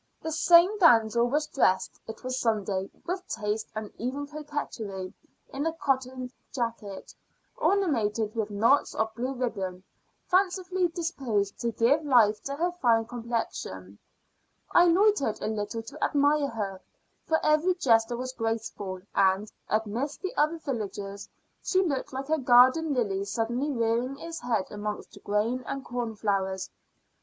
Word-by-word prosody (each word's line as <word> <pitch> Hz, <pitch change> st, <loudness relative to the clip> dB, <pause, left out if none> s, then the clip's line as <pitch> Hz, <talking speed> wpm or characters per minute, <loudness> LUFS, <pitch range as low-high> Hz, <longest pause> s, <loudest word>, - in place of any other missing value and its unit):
This 320 Hz, 0 st, -3 dB
same 355 Hz, +5 st, +6 dB
damsel 235 Hz, -, +5 dB
was 300 Hz, +3 st, +1 dB
dressed 190 Hz, -11 st, +1 dB
it 220 Hz, +3 st, -8 dB
was 255 Hz, 0 st, -2 dB
Sunday 200 Hz, -4 st, 0 dB, 0.2 s
with 365 Hz, +1 st, -4 dB
taste 210 Hz, 0 st, -2 dB
and 215 Hz, -1 st, -5 dB
even 260 Hz, +5 st, -3 dB
coquetry, 285 Hz, -11 st, -5 dB, 0.4 s
in 285 Hz, +4 st, -1 dB
a 325 Hz, -, -1 dB
cotton 260 Hz, -4 st, -2 dB, 0.2 s
jacket, 230 Hz, -6 st, -4 dB, 0.4 s
ornamented 230 Hz, -, +1 dB
with 220 Hz, -2 st, -2 dB
knots 225 Hz, +7 st, +3 dB
of 220 Hz, 0 st, -1 dB
blue 250 Hz, +4 st, -3 dB
ribbon, 195 Hz, -7 st, -3 dB, 0.4 s
fancifully 370 Hz, -1 st, +1 dB
disposed 270 Hz, -, -2 dB
to 235 Hz, -1 st, -1 dB
give 260 Hz, +8 st, +2 dB
life 225 Hz, -7 st, +4 dB
to 275 Hz, -, -3 dB
her 345 Hz, +4 st, 0 dB
fine 235 Hz, -10 st, +2 dB
complexion. 225 Hz, -, -4 dB, 0.7 s
I 350 Hz, -, +6 dB
loitered 355 Hz, -, +3 dB
a -, -, -4 dB
little 215 Hz, +1 st, -3 dB
to 225 Hz, -, -7 dB
admire 290 Hz, 0 st, +3 dB
her, 200 Hz, -5 st, -4 dB, 0.5 s
for 320 Hz, -, +3 dB
every 310 Hz, +4 st, +3 dB
gesture 235 Hz, -6 st, +3 dB
was 255 Hz, +1 st, -4 dB
graceful; 225 Hz, -5 st, -3 dB
and, 195 Hz, +2 st, +2 dB, 0.2 s
amidst 225 Hz, -, -2 dB
the 375 Hz, -, -3 dB
other 305 Hz, +3 st, +2 dB
villagers, 205 Hz, -8 st, -5 dB, 0.3 s
she 375 Hz, 0 st, +2 dB
looked 285 Hz, -7 st, -2 dB
like 270 Hz, +2 st, -5 dB
a 315 Hz, -, +3 dB
garden 260 Hz, +5 st, +5 dB
lily 200 Hz, -5 st, 0 dB
suddenly 240 Hz, +7 st, -1 dB
rearing 235 Hz, +2 st, 0 dB
its 330 Hz, +2 st, -6 dB
head 225 Hz, -6 st, 0 dB
amongst 210 Hz, 0 st, -5 dB
grain 220 Hz, +5 st, 0 dB
and 275 Hz, -1 st, -4 dB
corn 240 Hz, -2 st, -3 dB
flowers. 195 Hz, -3 st, -1 dB
240 Hz, 140 wpm, -28 LUFS, 215-295 Hz, 0.7 s, same